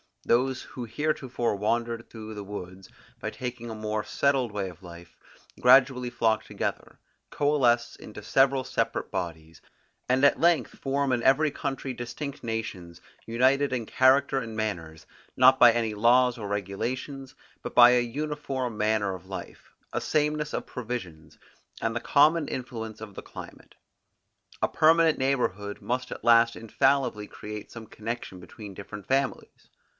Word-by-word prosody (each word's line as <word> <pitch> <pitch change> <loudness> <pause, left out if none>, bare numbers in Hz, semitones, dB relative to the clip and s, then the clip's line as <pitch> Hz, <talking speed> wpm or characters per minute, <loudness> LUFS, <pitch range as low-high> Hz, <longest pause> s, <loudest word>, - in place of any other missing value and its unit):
Those 130 +2 +1
who 125 - -7
heretofore 130 -3 -1
wandered 115 +3 -2
through 110 -1 -9
the 105 - -6
woods, 95 -2 -8 0.3
by - - -3
taking 125 -1 -6
to - - -6
a - - -7
more 110 0 -2
settled 135 -4 +1
way 100 -2 -3
of 90 0 -14
life, 85 -1 -12 0.4
gradually 125 0 +5
flock 110 -2 +1
together, - - -5 0.3
coalesce 125 -5 +2
into 105 -1 -11
several 135 +3 +3
separate - - -2
bodies, 80 -2 -5 0.5
and 130 +2 +2
at 140 - +5
length 170 -1 +2
form 140 0 -1
in 120 -2 +1
every 145 +3 +4
country 135 -1 -4
distinct 125 +4 -6
nations, 110 -7 -5 0.3
united 130 +4 +2
in 120 -3 -2
character 135 +3 +3
and 115 -3 -6
manners, 85 -8 -4 0.3
not 130 +1 +6
by 120 -1 +9
any 115 -2 -1
laws 120 +3 +4
or 105 -3 -5
regulations, 125 +8 -4 0.3
but - - -7
by 120 0 +9
an 120 -1 +1
uniform 135 -4 -3
manner 105 -2 +1
of 95 0 -10
life, 95 - -9 0.2
a - - -2
sameness 150 0 0
of - - -3
provisions, 95 - -7 0.4
and 115 0 -2
the - - 0
common 150 +3 +3
influence 115 -4 -6
of 105 -2 -8
the - - -8
climate. - - -11 0.9
A - - +3
permanent 160 0 +4
neighborhood 105 -7 -1
must 125 +1 -3
at - - -7
last 115 0 +5
infallibly 125 -2 +1
create 105 0 -8
some 115 -1 -9
connection 110 -4 -6
between 100 +2 -10
different 100 +1 -9
families. 135 0 -2
120 Hz, 150 wpm, -27 LUFS, 105-135 Hz, 0.9 s, by